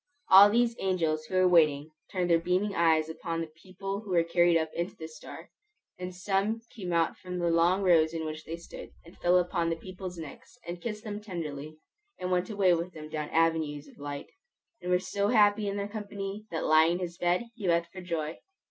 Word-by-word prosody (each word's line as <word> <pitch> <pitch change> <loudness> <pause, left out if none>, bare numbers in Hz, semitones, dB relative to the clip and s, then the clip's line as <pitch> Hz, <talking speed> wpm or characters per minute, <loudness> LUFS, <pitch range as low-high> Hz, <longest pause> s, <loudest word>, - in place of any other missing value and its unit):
All 195 +2 +10
these 235 +2 +2
angels 165 -5 0
who 185 - -5
were 185 0 +5
waiting 155 -4 +3 0.2
turned 180 -2 0
their 165 - +5
beaming 185 +4 0
eyes 160 -3 +3
upon 165 +1 -4
the 165 -1 -5
people 195 +2 -5
who 210 - -12
were 175 -2 +3
carried 175 0 +3
up 160 -1 -2
into 170 +2 -3
the 160 - -7
star; 155 -1 -11 0.5
and 180 0 -5
some 195 +4 0
came 190 -7 -6
out 165 -1 +1
from 180 -1 -6
the 170 -1 +1
long 175 +4 +3
rows 165 -4 +4
in 165 -1 -4
which 155 0 -5
they 165 - -6
stood, 170 - -10 0.2
and 170 - -15
fell 175 +1 +4
upon 175 -1 0
the 165 - 0
people's 185 +1 -8
necks, 160 - -10
and 175 0 -6
kissed 215 -2 -5
them 210 -2 -5
tenderly, 155 -6 -6 0.4
and 180 0 -4
went 180 +2 +1
away 200 -4 +3
with 170 +2 -2
them 155 -1 -9
down 150 -1 -4
avenues 160 -3 +1
of - - -18
light, 145 0 -6 0.5
and 180 - -5
were 180 - +4
so 200 +2 -1
happy 210 -2 +4
in 200 0 -2
their 200 0 -2
company, 205 0 -6
that 165 - -3
lying 160 +2 +5
in 175 - -2
his 175 0 -5
bed 175 +5 +1
he 210 -5 -5
wept 170 0 +2
for 185 - -8
joy. 165 -3 -3
175 Hz, 215 wpm, -29 LUFS, 165-195 Hz, 0.5 s, All